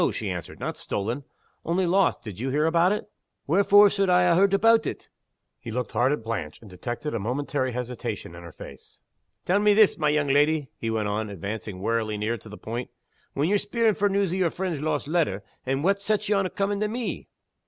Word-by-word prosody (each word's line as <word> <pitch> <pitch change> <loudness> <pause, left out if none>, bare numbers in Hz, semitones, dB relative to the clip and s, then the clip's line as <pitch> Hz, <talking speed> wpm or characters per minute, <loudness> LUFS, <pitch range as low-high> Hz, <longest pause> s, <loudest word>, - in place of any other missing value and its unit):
she - - -3
answered. - - -7
"Not - - -4
stolen. 115 +8 -3 0.4
Only 180 +3 0
lost. 190 +3 +2
Did 105 -4 -8
you 130 +3 -2
hear 150 +3 +1
about 170 +3 +3
it?" 210 0 -2 0.4
"Wherefore 200 +5 +6
suld 195 -1 +1
I 180 0 +5
ha' 175 -1 +4
heard 195 +2 +4
aboot 225 +3 +4
it?" - - -6 0.5
He - - -9
looked 125 +2 -3
hard 130 +3 +2
at 145 -6 -2
Blanche 105 -9 -4
and 110 - -14
detected 120 - -5
a 115 - -1
momentary 130 +3 -2
hesitation 125 -7 -5
in 85 - -10
her 85 -1 -10
face. - - -13 0.5
"Tell 190 +3 +3
me 210 0 +4
this, 215 -4 +5
my 150 -1 +2
young 150 -1 +1
leddy," 145 +1 +2
he 115 - -4
went 110 -2 -1
on, 105 +1 -2
advancing 100 0 -6
warily 110 0 -1
near 110 +3 -1
to 110 - -12
the 105 - -9
point. 120 +3 -5 0.5
"When 145 +3 +1
ye're 205 +2 +2
speering 220 +2 +1
for 205 0 +2
news 195 -2 +1
o' - - -1
your 180 -3 +2
friend's 175 -4 -3
lost 150 -2 -1
letter 150 - 0 0.2
what 155 +10 +1
sets 210 +1 0
ye 210 - +2
on 195 -2 +1
comin' 200 +1 -1
to 215 - +1
_me? 230 +2 -4
150 Hz, 215 wpm, -25 LUFS, -, 0.5 s, Wherefore